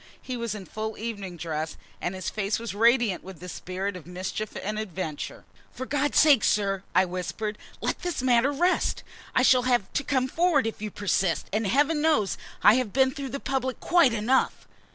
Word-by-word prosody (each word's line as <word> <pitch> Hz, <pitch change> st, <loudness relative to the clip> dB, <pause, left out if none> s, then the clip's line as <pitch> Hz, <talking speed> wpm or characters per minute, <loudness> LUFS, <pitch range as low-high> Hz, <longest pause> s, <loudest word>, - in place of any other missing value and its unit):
He 255 Hz, -, -5 dB
was 235 Hz, -3 st, -3 dB
in 200 Hz, -3 st, -8 dB
full 220 Hz, +2 st, -5 dB
evening 200 Hz, -6 st, -5 dB
dress, 160 Hz, -1 st, -4 dB, 0.2 s
and 180 Hz, -, -2 dB
his 185 Hz, -1 st, -5 dB
face 205 Hz, 0 st, -1 dB
was 230 Hz, -3 st, -5 dB
radiant 230 Hz, -2 st, +3 dB
with 190 Hz, -3 st, -10 dB
the 180 Hz, -, -9 dB
spirit 185 Hz, +2 st, -4 dB
of 175 Hz, -3 st, -10 dB
mischief 185 Hz, +4 st, -5 dB
and 215 Hz, +2 st, -2 dB
adventure. 185 Hz, -7 st, -5 dB, 0.3 s
"For 260 Hz, -, -6 dB
God's 290 Hz, +1 st, 0 dB
sake, 290 Hz, -7 st, +6 dB
sir," 195 Hz, -2 st, +1 dB
I 190 Hz, -, +5 dB
whispered, 185 Hz, +4 st, -4 dB, 0.3 s
"let -, -, -1 dB
this 350 Hz, -7 st, -3 dB
matter 250 Hz, +1 st, +4 dB
rest. 350 Hz, +6 st, +1 dB, 0.3 s
I 255 Hz, -, +4 dB
shall 255 Hz, -1 st, +6 dB
have 240 Hz, -6 st, +1 dB
to 290 Hz, -, 0 dB
come 260 Hz, -2 st, +1 dB
forward 330 Hz, -1 st, +2 dB
if 225 Hz, -2 st, -4 dB
you 215 Hz, -, -3 dB
persist, 195 Hz, -3 st, 0 dB
and 215 Hz, 0 st, +1 dB
Heaven 295 Hz, +7 st, +2 dB
knows 295 Hz, -11 st, +2 dB, 0.2 s
I 220 Hz, -, +7 dB
have 225 Hz, -5 st, -5 dB
been 265 Hz, 0 st, +4 dB
before 275 Hz, -1 st, -6 dB
the 275 Hz, -, -4 dB
public 260 Hz, -2 st, -2 dB
quite 340 Hz, -8 st, +4 dB
enough!" 230 Hz, +4 st, +1 dB
220 Hz, 195 wpm, -26 LUFS, 190-265 Hz, 0.3 s, I